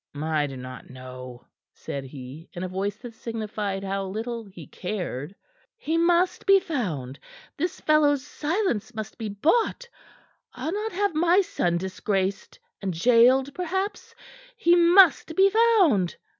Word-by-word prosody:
"I 155 0 0
do 135 -1 -8
not 130 0 -9
know," 130 -1 -10 0.3
said 140 -1 -6
he, 135 +4 -10
in 175 -1 -5
a - - -2
voice 195 +2 -3
that 240 -2 -8
signified 215 -4 -4
how 195 0 -2
little 225 +4 -5
he 180 -5 -12
cared. 180 -4 -5 0.4
"He 320 -7 -2
must 345 +3 +2
be 390 0 +7
found. 165 - -4 0.4
This 345 +4 -3
fellow's 290 -3 +3
silence 295 - -2
must 220 +1 -7
be 220 -2 -3
bought. 440 - +1 0.7
I'll 320 - -3
not 430 +2 -2
have 400 0 0
my 345 +5 +4
son 175 - -1
disgraced, 190 +2 -2 0.2
and 185 -5 -3
gaoled, 250 +5 +5
perhaps. 380 +5 -3 0.4
He 350 -6 +4
must 345 -2 +5
be 390 +2 +5
found." 390 - +3
225 Hz, 140 wpm, -25 LUFS, -, 0.7 s, be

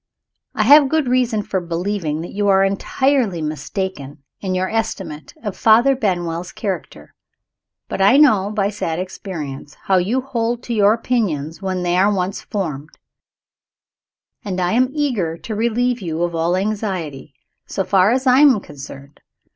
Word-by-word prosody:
I - - +2
have 290 -1 +7
good 315 -3 +1
reason 245 -4 +1
for 190 -2 -2
believing 170 -2 -2
that 170 - -7
you 205 0 0
are 195 -1 +4
entirely 215 +1 +1
mistaken 150 -1 -5 0.2
in 185 -2 -2
your 185 +1 0
estimate 185 -9 -4
of 205 -4 -4
Father 235 +5 +4
Benwell's 175 -6 -2
character. 195 -4 -6 0.7
But - - -3
I 205 +8 +6
know, 215 -10 +5
by 205 -1 0
sad 165 -6 -3
experience, 160 -7 -6
how 190 - +2
you 210 +9 +1
hold 240 -2 -2
to 240 - -4
your 210 -1 +4
opinions 190 - -2
when 185 -2 -2
they 175 0 +1
are 195 +3 +4
once 190 0 -2
formed; 155 -7 -5 1.5
and 190 -3 -3
I 180 0 +1
am 250 +2 +3
eager 240 - -1
to 220 - -7
relieve 235 +2 0
you 165 -2 -2
of 175 0 -1
all 165 +2 +1
anxiety, 185 - -3 0.3
so 195 - -2
far 190 0 +3
as 255 +3 0
I 255 0 +5
am 280 -7 +6
concerned. 140 -3 -11
195 Hz, 155 wpm, -19 LUFS, 170-230 Hz, 1.5 s, have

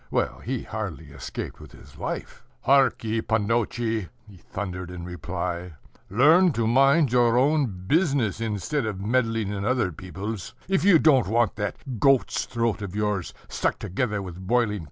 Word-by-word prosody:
Well, - - -1
he - - -3
hardly - - -6
escaped - - -6
with - - -13
his - - -15
life. - - -5 0.2
"Hark 135 -3 +3
ye, 110 0 0
pannotche!" 110 +1 0
[Footnote: 115 -2 0
Sir] 90 - -12 0.2
he 100 -3 -14
thundered 90 -1 -6
in 90 -1 -7
reply, 90 +1 -4 0.4
"learn 155 - +5
to 115 -3 0
mind 135 +4 +4
your 120 -1 +4
own 145 +2 +3 0.2
business 135 - +1
instead 110 +4 -1
of 100 -3 -4
meddling 115 0 0
in 100 -1 -3
other 120 -5 +1
people's, 95 +4 -6
if 190 -2 +1
you 195 -3 +7
don't 135 -9 +4
want 115 +1 +2
that 105 +4 -4
goat's 135 +1 +3
throat 115 -3 -1
of 100 -2 -6
yours 105 -4 -1
stuck - - -1
together 105 +1 -2
with 90 -2 -8
boiling 120 0 +3
kutya." 105 0 -3
110 Hz, 170 wpm, -25 LUFS, 100-130 Hz, 0.4 s, you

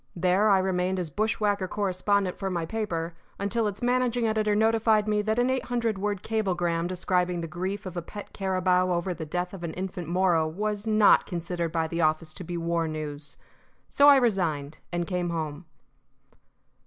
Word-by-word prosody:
There 185 +4 +3
I 195 - +6
remained 185 0 0
as 175 -4 -3
bush 215 +8 0
whacker 205 -3 +1
correspondent 200 0 0
for 195 - -2
my 170 -3 -2
paper 170 -5 -3 0.2
until 215 +3 0
its 205 +2 -5
managing 245 -1 +1
editor 215 -1 +1
notified 220 0 +3
me 210 0 +2
that 220 +2 -1
an 245 +1 +2
eight 260 -1 -1
hundred 230 -4 -1
word 205 -1 -2
cablegram 175 -6 0
describing 180 -1 0
the 165 - -4
grief 190 +5 -4
of 185 -1 -6
a 175 - -2
pet 205 +5 -9
carabao 185 -1 +1
over 175 +1 -1
the 160 -2 -7
death 180 +4 -3
of 185 -3 -8
an 165 -2 -4
infant 180 -2 -5
Moro 175 -2 +2
was 205 +5 -3
not 215 -1 +5
considered 170 -2 -3
by 165 -1 0
the 170 +1 -2
office 155 0 +1
to 180 - -8
be 175 0 -4
war 170 -1 0
news. 150 -1 -5 0.5
So 285 - +4
I 285 - +9
resigned, 165 - 0
and 175 0 -1
came 180 -1 -2
home. 160 -1 -4
185 Hz, 185 wpm, -27 LUFS, 170-210 Hz, 0.5 s, I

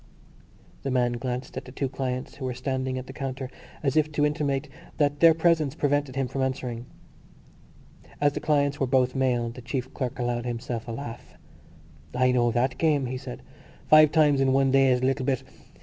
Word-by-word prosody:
The 135 - -3
man 125 -2 +2
glanced 125 +1 -4
at - - -5
the 125 - -10
two 135 +1 -2
clients 130 -1 -4
who 135 - -7
were 125 -1 -3
standing 130 0 -2
at 130 - -5
the 130 - -10
counter 135 -2 -5 0.3
as 140 0 +1
if 155 0 +2
to 145 0 +2
intimate 150 -1 -1 0.3
that 145 -1 +1
their 165 -1 +7
presence 160 -4 +2
prevented 145 -3 0
him 135 -1 0
from 135 +2 -3
answering. 125 -2 -3 1.3
As 145 -1 +3
the - - -3
clients 145 -1 +1
were 135 - +1
both 130 -1 +2
male 125 -3 0
the 125 - -10
chief 125 +2 -4
clerk 130 -4 -3
allowed 120 -1 -2
himself 120 0 -4
a - - -4
laugh. 115 -1 -8 0.8
"I 130 0 +3
know 120 -1 +3
that 120 +3 0
game," 150 -4 +2
he 130 +1 -3
said. 125 -1 -8 0.5
"Five 155 -1 +8
times 150 -3 +4
in 130 -1 +3
one 135 0 +3
day 135 0 +5
is 125 0 +2
a - - +1
little 135 +1 +1
bit.... 135 -1 0
130 Hz, 195 wpm, -26 LUFS, 125-145 Hz, 1.3 s, Five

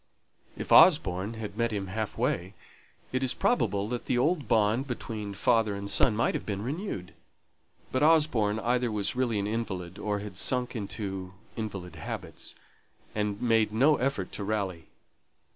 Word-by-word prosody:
If - - -6
Osborne 115 - +6
had 105 -3 -6
met 115 0 +1
him 100 -2 -2
half 105 +3 -4
way, 90 +4 -1 0.6
it 130 - 0
is 130 -1 0
probable 100 - +1
that 120 0 -4
the 125 - +1
old 150 0 +1
bond 110 +4 +2
between 110 -5 -5
father 110 -1 +2
and 100 0 -5
son 105 +2 +3
might 115 - +1
have - - -3
been 100 -1 -3
renewed; 125 - -4 0.8
but 130 - 0
Osborne 150 -10 +4
either 120 0 +1
was 105 +1 -1
really 125 -4 +1
an 100 - -1
invalid, 100 -4 -4
or 105 -1 -1
had 100 -2 -6
sunk 125 +4 0
into 95 -3 -5 0.2
invalid 100 -5 -5
habits, - - -7 0.6
and 105 -1 -1
made 115 -3 +3
no 135 +7 +4
effort 125 -8 -1
to 100 - -5
rally. 100 -6 -2
110 Hz, 160 wpm, -29 LUFS, 100-125 Hz, 0.8 s, Osborne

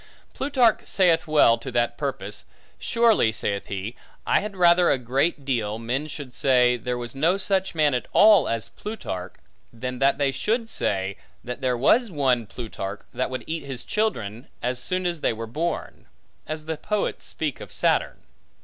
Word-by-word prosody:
Plutarch 260 -5 +3
saith 175 -4 +3
well 145 -7 +5
to 135 - -6
that 120 0 +1
purpose: 105 -8 -4 0.3
Surely 230 - +3
(saith 100 -2 -3
he) 100 +4 -5 0.3
I - - +3
had 210 -1 -5
rather 175 0 +5
a - - +3
great 135 +4 0
deal, 110 -5 -1
men 125 +6 -2
should 145 -4 -8
say, 125 -2 +4
there 125 +1 -3
was 120 -1 -5
no 160 +8 +2
such 190 -2 0
man 150 -3 +3
at 125 - -2
all, 210 -1 +6
as 115 -1 -2
Plutarch, 95 - -6 0.4
than 125 +2 -5
that 135 0 +3
they 140 -1 +2
should 225 - -1
say, 95 - -1 0.3
that 125 +2 -6
there 125 -2 +1
was 225 - +4
one 130 - +1
Plutarch, 100 -4 -6
that 130 - -1
would 130 0 -4
eat 160 -1 -4
his 135 -3 -6
children 120 - -2 0.2
as 125 +1 -1
soon 185 +6 -1
as 170 -3 -1
they - - +2
were 115 +1 -5
born; 160 +9 -4 0.4
as 155 0 -5
the 160 0 -3
poets 210 +6 -2
speak 150 -4 -3
of - - -9
Saturn. - - +1
135 Hz, 175 wpm, -24 LUFS, 120-175 Hz, 0.4 s, all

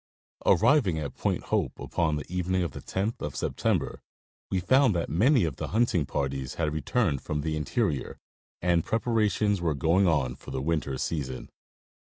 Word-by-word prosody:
Arriving 120 - +4
at 75 -2 -4
Point - - -1
Hope - - -1
upon 80 -3 0
the 75 - -4
evening 90 +1 0
of 85 - -2
the - - -8
10th 100 +4 -2
of 75 -1 -4
September, - - -1 0.5
we 95 - 0
found 130 +2 +4
that 85 -4 -2
many 115 - +4
of 80 -6 -2
the - - -3
hunting 105 - +1
parties 70 -3 -3
had 75 -3 -1
returned 80 - 0
from 75 -1 -3
the 80 +1 -2
interior, 75 -2 -1 0.5
and 85 -2 +3
prepar 115 +1 -1
ations 105 -2 0
were 80 -3 0
going 85 +6 +3
on 70 -7 +1
for 65 - -13
the - - -3
winter 70 -2 -1
season. 65 -3 -4
85 Hz, 170 wpm, -28 LUFS, 75-95 Hz, 0.5 s, Arriving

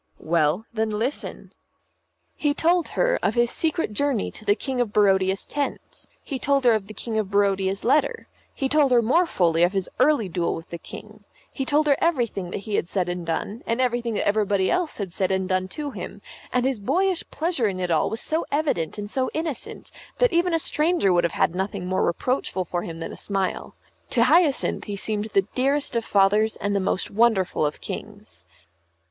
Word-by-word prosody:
"Well, 165 +5 +1
then, 220 -1 0
listen." 225 +7 -3 0.8
He 290 -1 0
told 340 +1 +2
her - - +2
of 215 - 0
his 240 0 +2
secret 320 -7 -1
journey 275 -1 0
to - - -11
the 205 -1 +3
King 260 +1 -2
of 230 -4 -1
Barodia's 195 -2 +2
tent; 290 -1 -4 0.2
he 270 -3 -4
told 275 -1 +1
her 240 - +6
of 210 -3 -1
the 215 - -10
King 225 -2 -2
of 205 -3 -2
Barodia's 195 -1 +1
letter; 280 +5 +1 0.2
he 270 - -2
told 285 -1 +3
her 240 -2 +5
more 335 +10 +3
fully 170 - +2
of 175 +3 +4
his 195 -2 -1
early 255 -5 +3
duel 175 -1 -1
with 165 - -10
the 170 - -5
King; 215 +5 -11 0.3
he 270 - -3
told 295 +3 +2
her 285 -2 +4
everything 235 - 0
that - - -4
he 215 - -5
had 170 - -2
said 180 -3 -1
and 175 -1 -4
done; 200 +7 -3
and 230 +2 0
everything 240 -3 0
that - - 0
everybody 205 -2 +2
else 360 -3 -1
had 195 -5 -5
said 190 -1 0
and 190 0 0
done 185 -1 0
to 290 +8 -5
him; - - -8 0.3
and 250 0 +1
his 265 -4 0
boyish 365 - +1
pleasure 320 -8 0
in 190 -2 -3
it 180 -1 -1
all 160 - +2
was 225 - -3
so 320 +2 -1
evident 280 - 0
and 205 0 -4
so 255 +4 -1
innocent, 315 -5 -4 0.3
that - - +3
even 345 +1 +2
a 330 - +3
stranger 310 - +2
would 175 0 +3
have 170 - -1
had 165 - +1
nothing 190 0 -3
more 185 +1 0
reproachful 190 0 -1
for 175 0 -2
him 165 -1 -7
than - - -5
a - - -8
smile. 195 -2 -3 0.3
To 235 - +3
Hyacinth 305 +2 +3
he 205 - -4
seemed 210 +1 -1
the 195 -3 +1
dearest 275 +1 0
of 230 - +1
fathers 210 +2 +3
and 205 0 -2
the - - +2
most 185 0 -1
wonderful 200 -8 +2
of 150 - -7
kings. 85 +2 -8
215 Hz, 205 wpm, -24 LUFS, 190-275 Hz, 0.8 s, her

